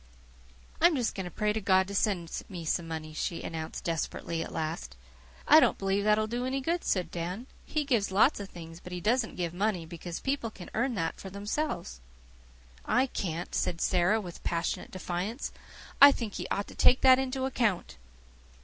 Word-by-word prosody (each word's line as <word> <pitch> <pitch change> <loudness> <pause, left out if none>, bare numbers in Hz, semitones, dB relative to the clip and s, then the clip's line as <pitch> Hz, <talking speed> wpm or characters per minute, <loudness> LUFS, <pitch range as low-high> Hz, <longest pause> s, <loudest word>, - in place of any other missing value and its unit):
"I'm 340 -1 +6
just 245 -4 0
going 190 - -4
to - - -5
pray 210 +4 0
to 220 - -2
God 190 -1 +4
to 200 - -6
send 185 -5 0 0.2
me 175 -4 -6
some 165 +1 0
money," 155 -1 -5
she 165 +2 -3
announced 160 -1 -5
desperately 165 0 -2
at - - -5
last. 65 - -4 0.5
"I - - +9
don't - - +3
believe 195 +1 0
that 210 0 +5
will 215 - +1
do 240 +3 -3
any 260 +2 -1
good," 335 +6 -1
said 180 -4 0
Dan. 180 +7 -4 0.2
"He 305 - 0
gives 235 -7 +2
lots 210 +8 +4
of 200 -1 -6
things, 165 -1 -10
but 180 0 -9
he 180 - -3
doesn't 225 +5 +1
give 175 -2 -2
money, 190 -2 0
because 170 +1 -6
people 270 -4 -1
can 190 -4 -11
earn 240 +2 0
that 165 -4 -2
for 190 - -7
themselves." 200 - -3 0.8
"I 260 - +3
can't," 175 -8 -4
said 165 - 0
Sara, 185 +5 +3
with 180 -5 -8
passionate 170 -1 -2
defiance. 185 +7 -4 0.5
"I 285 0 +12
think 230 -6 -4
He - - -4
ought 200 - -1
to - - -10
take 255 - +5
that 260 -1 +7
into 265 0 -1
account." 215 - 0
195 Hz, 195 wpm, -29 LUFS, 170-235 Hz, 0.8 s, I